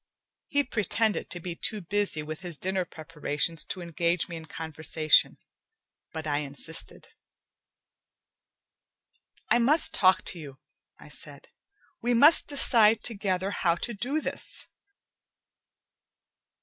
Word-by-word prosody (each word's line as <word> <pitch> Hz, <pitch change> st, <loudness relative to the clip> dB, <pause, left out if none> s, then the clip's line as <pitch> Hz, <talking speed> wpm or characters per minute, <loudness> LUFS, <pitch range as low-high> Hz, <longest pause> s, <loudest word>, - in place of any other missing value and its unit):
He 285 Hz, -1 st, +1 dB
pretended 220 Hz, -3 st, -1 dB
to 175 Hz, -, -5 dB
be 175 Hz, 0 st, -6 dB
too 215 Hz, +4 st, -2 dB
busy 195 Hz, -4 st, -1 dB
with 155 Hz, +2 st, -7 dB
his 175 Hz, -4 st, -6 dB
dinner 185 Hz, +1 st, -1 dB
preparations 155 Hz, 0 st, -1 dB
to 185 Hz, -, -3 dB
engage 170 Hz, 0 st, -1 dB
me 170 Hz, -, -7 dB
in 160 Hz, -1 st, -8 dB
conversation, 160 Hz, -1 st, +2 dB, 0.7 s
but 160 Hz, -1 st, -6 dB
I 145 Hz, -1 st, 0 dB
insisted. 145 Hz, +3 st, -7 dB, 2.4 s
"I 240 Hz, -, +5 dB
must 295 Hz, +7 st, +4 dB
talk 185 Hz, -1 st, +4 dB
to 175 Hz, -, 0 dB
you," 140 Hz, -4 st, -10 dB, 0.4 s
I -, -, -15 dB
said. -, -, -8 dB, 0.5 s
"We 240 Hz, 0 st, +1 dB
must 295 Hz, +7 st, +6 dB
decide 225 Hz, -6 st, +4 dB
together 195 Hz, -3 st, -2 dB
how 170 Hz, -4 st, +1 dB
to 235 Hz, +7 st, -3 dB
do 250 Hz, +9 st, -2 dB
this." -, -, -4 dB
180 Hz, 120 wpm, -27 LUFS, 160-215 Hz, 2.4 s, must